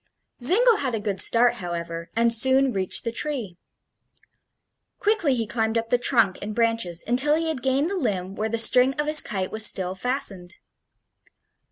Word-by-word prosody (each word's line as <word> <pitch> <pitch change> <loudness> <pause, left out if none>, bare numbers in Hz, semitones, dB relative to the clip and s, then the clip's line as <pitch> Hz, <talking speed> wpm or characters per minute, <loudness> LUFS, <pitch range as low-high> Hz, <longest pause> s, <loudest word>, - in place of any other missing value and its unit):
Zingle 440 - +3
had 260 -4 -3
a - - -4
good 205 -2 -1
start, 240 +1 +3
however, 170 -1 -7
and 230 0 +4
soon 260 +2 +3
reached 190 -2 -2
the 230 - -4
tree. 235 - -5 1.4
Quickly 405 -11 0
he 230 -2 -3
climbed 220 +1 -2
up 230 0 -4
the 245 - +2
trunk 230 -7 +1
and 210 +1 -7
branches 230 -7 -1
until 265 +6 +2
he 325 0 -2
had 295 -6 -5
gained 270 +6 -1
the 395 - -3
limb 190 - -4
where 215 +2 -4
the 230 - -3
string 250 +3 +4
of 295 - -3
his 305 0 +4
kite 190 -3 -5
was 220 0 +2
still 185 -3 +3
fastened. 195 -6 -1
230 Hz, 175 wpm, -23 LUFS, 200-270 Hz, 1.4 s, and